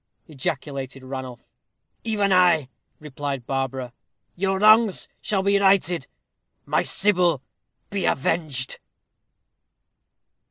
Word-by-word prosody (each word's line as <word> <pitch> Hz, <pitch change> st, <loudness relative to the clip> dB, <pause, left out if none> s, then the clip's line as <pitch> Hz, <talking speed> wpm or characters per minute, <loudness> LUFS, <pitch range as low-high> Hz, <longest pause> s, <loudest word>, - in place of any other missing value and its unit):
ejaculated 135 Hz, -2 st, -5 dB
Ranulph. 130 Hz, -2 st, -8 dB, 0.5 s
"Even 205 Hz, -4 st, +1 dB
I," 175 Hz, -7 st, +4 dB, 0.3 s
replied 140 Hz, -3 st, -5 dB
Barbara. 130 Hz, -2 st, -3 dB, 0.4 s
"Your 190 Hz, +1 st, 0 dB
wrongs 215 Hz, 0 st, +5 dB
shall 195 Hz, -2 st, 0 dB
be 200 Hz, 0 st, +3 dB
righted 190 Hz, -6 st, +2 dB, 0.6 s
my -, -, +1 dB
Sybil 180 Hz, -8 st, +1 dB, 0.5 s
be 200 Hz, -2 st, -1 dB
avenged." 140 Hz, -3 st, -1 dB
160 Hz, 85 wpm, -23 LUFS, 135-195 Hz, 0.6 s, wrongs